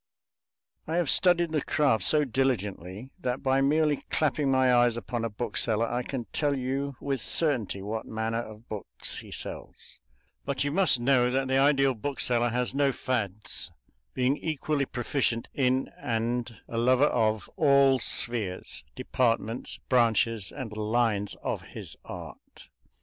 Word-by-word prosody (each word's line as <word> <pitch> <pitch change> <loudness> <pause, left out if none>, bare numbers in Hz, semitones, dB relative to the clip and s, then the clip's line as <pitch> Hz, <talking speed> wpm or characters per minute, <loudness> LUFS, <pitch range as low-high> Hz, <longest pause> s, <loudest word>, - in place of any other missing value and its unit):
I 160 - -2
have 175 -5 +2
studied 175 -3 +3
the 155 -2 0
craft 135 -10 +2
so 150 +7 +4
diligently 115 -4 -2
that 125 0 -3
by 135 0 +2
merely 150 +1 +2
clapping 150 -2 +1
my 130 -1 +4
eyes 120 -1 +4
upon 120 0 -4
a 115 - -1
bookseller 115 0 -1
I 120 +2 -2
can 125 -1 -5
tell 145 -2 +1
you 135 +2 -2
with 135 -3 -2
certainty 120 - +2
what 110 +2 -4
manner 110 +1 -2
of 110 0 -9
books 80 - -4
he - - -12
sells; - - -6 0.4
but 140 -1 -2
you 145 - -1
must 180 -6 +3
know 125 0 +3
that 135 +1 0
the 130 0 +2
ideal 135 -1 +4
bookseller 120 -1 -1
has 125 +1 -1
no 140 0 +2
fads, 110 -6 -2 0.5
being 130 +3 +1
equally 150 -2 -1
proficient 120 -1 -1
in 130 -1 +1
and 115 0 -2
a 115 - -3
lover 130 +4 +4
of 110 -6 +1
all 140 -5 +4
spheres, 110 -6 -1
departments, 115 -1 -1
branches, 115 -4 +2
and 110 -5 -7
lines 110 -1 0
of - - -2
his - - -10
art. - - -11
125 Hz, 145 wpm, -28 LUFS, 115-140 Hz, 0.5 s, so